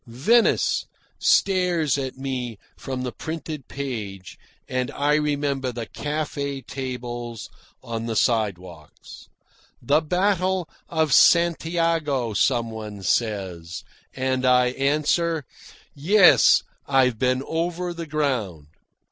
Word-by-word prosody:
"Venice" 150 - +2 0.3
stares 180 -6 +2
at 135 -2 -4
me 125 -4 -4 0.2
from 130 -1 -5
the 125 - -3
printed 155 -2 -6
page, 105 -9 -6 0.3
and 130 -1 -2
I 145 +1 0
remember 145 -3 0
the 120 -1 -5
cafe 145 0 -4
tables 120 -3 -6 0.3
on 115 0 -4
the 115 - -2
sidewalks. 90 - -2 0.5
"The 145 +6 +2
Battle 185 +1 0 0.2
of 160 -4 +1
Santiago," 165 -7 +3
some 115 +2 +1
one 105 -3 -8
says, 95 -6 -2 0.3
and 130 0 -1
I 125 -1 +4
answer, 150 +4 0 0.5
"Yes, 160 - +5 0.2
I've 130 -4 +2
been 130 +1 +1
over 175 +2 -2
the 170 -1 -7
ground." 120 - -2
135 Hz, 105 wpm, -23 LUFS, 120-155 Hz, 0.5 s, Yes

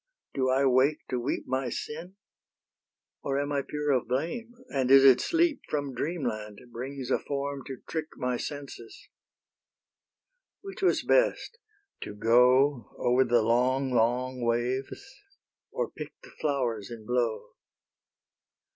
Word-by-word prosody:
Do 130 -1 +1
I 135 +2 +3
wake 135 +3 +2
to 125 - 0
weep 125 +4 -2
My 130 0 -1
sin? 165 +9 -6 1.1
or 135 0 -1
am 145 0 -2
I 140 -1 +1
pure 150 +1 -2
of 130 -4 +1
blame, 170 - -3
And 130 -2 0
is 135 0 +8
it 130 -2 +7
sleep 335 -2 +1
From 145 -3 -2
dreamland 120 -8 -3
brings 130 +2 -6
a - - +3
form 140 0 -4
to 135 -2 -8
trick 160 -1 -3
My 125 0 -1
senses? 140 -3 -8 1.5
Which 390 -2 -9
was 375 - +2
best? - - +1 0.4
to 105 - -6
go 125 +3 +4
Over 125 +2 +3
the 120 -2 +3
long, 130 +4 +2
long 125 +2 +1
waves, 120 - -1 0.6
or - - -3
pick - - -8
The - - -14
flowers 125 -8 -2
in 115 -2 -9
blow? 120 -2 -1
130 Hz, 135 wpm, -28 LUFS, 120-145 Hz, 1.5 s, is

